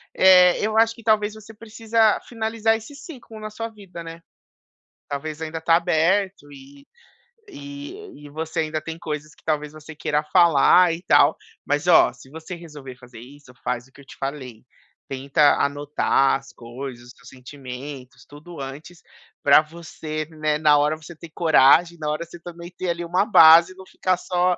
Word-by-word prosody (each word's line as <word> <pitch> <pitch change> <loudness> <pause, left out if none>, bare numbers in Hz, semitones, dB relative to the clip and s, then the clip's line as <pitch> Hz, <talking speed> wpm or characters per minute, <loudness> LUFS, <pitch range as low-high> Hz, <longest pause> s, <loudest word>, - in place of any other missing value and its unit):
É, 180 -1 +6
eu 215 +1 -1
acho 225 0 +4
que 230 -1 -16
talvez 210 -1 +1
você 220 0 -13
precisa 225 0 0
finalizar 225 -1 -1
esse 225 +6 -12
ciclo 270 -7 -12
na 215 - -7
sua 225 +2 -6
vida, 195 -6 -11
né. 165 0 -10 0.9
Talvez 150 +2 -6
ainda 160 0 -5
tá 165 +1 +3
aberto 175 0 0
e 140 0 -15 0.6
e 290 - -11
e - - -11
você 160 +2 -4
ainda 155 0 -3
tem 165 +1 -7
coisas 155 -2 -7
que, - - -27
talvez, 150 -2 -2
você 155 +1 -12
queira 150 0 -1
falar 175 +1 +5
e 170 +3 -8
tal. 145 -2 +4 0.3
Mas 145 +3 -1
ó, 175 - +5
se - - -17
você 160 +3 -8
resolver 150 -6 -11
fazer 125 -3 -14
isso, 135 +2 -15
faz 125 0 -3
o - - -27
que 140 - -17
eu - - -18
te - - -14
falei, 130 -5 -7 0.4
tenta 140 +2 +2
anotar 140 -1 +1
as 135 - -17
coisas, 120 +1 -9
os 125 - -14
teus 125 - -17
sentimentos, 130 0 -10
tudo 150 +3 -13
antes, 140 +6 -9 0.4
para 140 +1 +6
você, 155 -1 -7
né, 155 -1 -1
na 150 -1 +4
hora 150 +2 +1
você 160 +2 -13
ter 165 +1 -12
coragem, 165 +1 +4
na 150 -1 -3
hora 155 +3 -3
você 170 +1 -13
também 170 0 -10
ter, 185 - -4
ali, 170 0 -3
uma 180 +4 +1
base 170 -3 +7
e - - -26
não 190 0 -13
ficar 185 -1 -1
só 180 0 0
160 Hz, 180 wpm, -22 LUFS, 145-185 Hz, 0.9 s, base